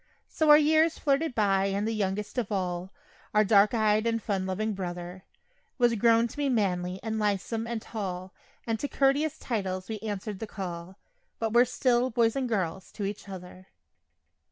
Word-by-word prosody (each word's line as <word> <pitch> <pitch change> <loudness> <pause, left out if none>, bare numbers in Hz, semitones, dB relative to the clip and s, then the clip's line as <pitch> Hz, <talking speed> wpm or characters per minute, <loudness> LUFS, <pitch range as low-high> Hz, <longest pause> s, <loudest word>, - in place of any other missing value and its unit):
So 315 -1 0
our 295 - +10
years 315 +2 +3
flitted 285 0 0
by 195 -3 +2
and 200 +2 -1
the 225 - -1
youngest 210 +3 -2
of 225 -3 -3
all 180 -1 -2 0.4
Our 215 - +6
dark 205 +2 +4
eyed 215 0 +2
and 230 0 +1
fun 195 -3 -2
loving 215 +3 -1
brother 180 0 -6 0.5
Was 240 -2 +3
grown 230 +1 +4
to - - -12
be 290 -1 0
manly 185 -6 0
and 220 -1 -2
lithesome 210 +2 -1
and 235 -1 -2
tall, 185 -4 -5 0.3
And 225 -1 -1
to 285 - -2
couteous 285 +3 +1
titles 190 -5 -3
we 220 -1 -4
answered 205 -1 -5
the 220 - -5
call, 180 -2 -7 0.4
But 225 -1 -2
were 240 +1 +6
still 250 0 +1
"boys" 230 -2 +2
and 260 -2 -1
"girls" 190 -4 -2
to 205 - -4
each 200 0 -5
other. 185 0 -10
215 Hz, 180 wpm, -28 LUFS, 190-235 Hz, 0.5 s, our